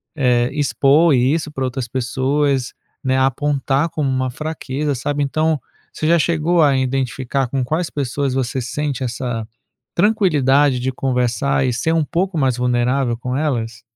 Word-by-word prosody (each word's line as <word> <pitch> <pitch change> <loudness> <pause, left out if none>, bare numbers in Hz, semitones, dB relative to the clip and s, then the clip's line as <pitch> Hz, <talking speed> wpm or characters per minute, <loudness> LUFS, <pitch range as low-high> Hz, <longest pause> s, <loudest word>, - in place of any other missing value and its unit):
eh, 125 -4 +2
expor 145 +3 +3
isso 145 +5 +1
pra 135 -3 -3
outras 130 -1 -3
pessoas, 130 +2 0 0.3
né, 130 0 +1
apontar 140 +2 +1
como 150 -3 -1
uma 130 -1 -1
fraqueza, 150 -1 -3
sabe? 145 +4 -2
Então, 155 +2 0 0.3
você 155 - -2
já 170 +1 +5
chegou 165 +1 +2
a 140 -2 +4
identificar 130 0 -1
com 135 0 -1
quais 155 +6 -1
pessoas 140 -1 -2
você 130 0 -1
sente 135 +2 -3
essa 120 -2 -3 0.5
tranquilidade 145 - +3
de 130 +2 -1
conversar 130 +1 0
e - - +1
ser 160 +7 0 0.2
pouco 185 +2 0
mais 130 -4 +1
vulnerável 125 +1 +1
com 125 +2 -3
elas? 115 -7 -2
135 Hz, 145 wpm, -19 LUFS, 125-150 Hz, 0.5 s, já